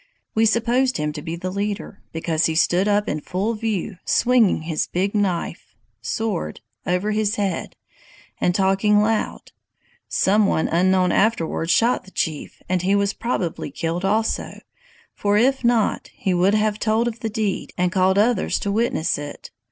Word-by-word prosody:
We 225 +1 +3
supposed 240 +4 +2
him 150 -1 -2
to 150 - -6
be 165 +2 -5
the 185 +2 -4
leader, 200 0 -4
because 160 0 0
he 160 - -2
stood 175 +4 +3
up 205 0 +2
in 150 - -2
full 195 +8 -2
view, 215 -3 -3
swinging 235 -9 +3
his 160 -1 -2
big 190 +3 -1
knife 175 - -2 0.3
[sword] 180 - -3 0.3
over 180 +4 0
his 215 0 0
head, 200 -2 -2 0.6
and 175 - +1
talking 195 +2 +3
loud. 220 0 -1 0.6
Some 205 +2 +3
one 160 - +1
unknown 185 +1 +2
afterwards 170 -6 +1
shot 235 +4 +2
the - - -13
chief, 155 -5 -4
and 185 -1 0
he 190 +3 +2
was 200 0 +1
probably 195 -11 -3
killed 165 +5 -3
also; 215 +3 -1 0.5
for 205 0 +1
if 265 +4 +2
not, 235 -2 +1
he 190 - -1
would 185 +4 +3
have 215 0 +1
told 225 +2 +1
of 230 -1 -4
the 225 - -3
deed, 215 -3 -2
and 180 -1 +1
called 190 +1 +2
others 230 +3 +2
to 200 - -1
witness 210 -9 0
it. 145 0 -8
200 Hz, 165 wpm, -22 LUFS, 175-220 Hz, 0.6 s, We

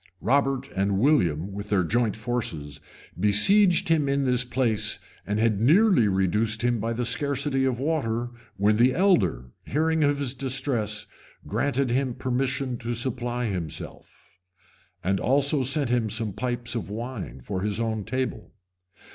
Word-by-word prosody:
Robert 135 +1 +1
and 95 0 +1
William, 100 - +2
with 100 +1 -6
their 100 -3 +2
joint 115 +4 0
forces, 110 - -4 0.4
besieged 175 - +4
him 155 -4 +2
in 140 0 +1
this 125 -1 +1
place, 120 -3 0 0.3
and 105 +1 -1
had 110 -2 +1
nearly 165 - +5
reduced 105 +4 0
him 120 -1 +1
by 115 +2 -2
the 120 +1 -2
scarcity 140 +1 0
of 130 -3 0
water, 120 -5 -1 0.3
when 105 +2 +3
the 125 +3 +4
elder, 170 - +2 0.2
hearing 160 +2 +1
of 145 0 +2
his 140 -3 -1
distress, 125 -6 -1 0.4
granted 130 +3 0
him 130 -1 0
permission 130 0 -2
to 120 0 -3
supply 120 0 -2
himself, 90 -2 -7 0.6
and 95 +1 +1
also 140 +2 +2
sent 135 0 0
him 120 -3 +1
some 110 -2 -3
pipes 120 +2 -3
of 115 -4 -4
wine 110 - -6
for 95 +8 -4
his 105 +2 -1
own 110 -2 -1
table. 130 0 -4
120 Hz, 145 wpm, -25 LUFS, 105-135 Hz, 0.6 s, nearly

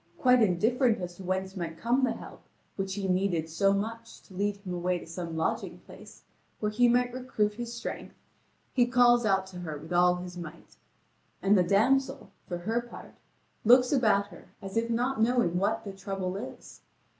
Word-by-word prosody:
Quite 250 -1 +4
indifferent 225 +5 +2
as 175 -1 -6
to 190 - -9
whence 190 +1 -2
might 165 -3 -5
come 245 +7 +1
the 245 -3 +2
help, - - -11 0.3
which 195 -1 -3
he 200 -2 -3
needed 180 -3 0
so 180 +5 +2
much 230 +3 -4
to 195 - -17
lead 200 +2 -1
him 195 -3 -7
away 180 +1 0
to - - -10
some 165 -1 -6
lodging 160 - -2
place, - - -14 0.4
where 210 -1 -1
he 245 +3 +4
might 245 0 +2
recruit 250 -5 -1
his 235 +2 -6
strength, 235 0 -6 0.6
he 245 -2 +3
calls 240 -2 +4
out 190 -1 +2
to 185 -1 -10
her 155 -4 -5
with 160 +4 -8
all 180 0 +4
his 180 0 -8
might. 165 -1 -10 0.7
And 200 +2 +5
the 185 - +5
damsel, 225 +9 +1 0.2
for 175 - -3
her 225 +7 -1
part, 240 - -12 0.5
looks 250 +2 +6
about 215 -7 +3
her 175 - -14
as 195 -1 -8
if 230 +1 0
not 245 +1 0
knowing 230 -7 +2
what 210 +4 0
the 200 - -7
trouble 195 -1 -4
is. 200 - -9
200 Hz, 190 wpm, -29 LUFS, 180-235 Hz, 0.7 s, looks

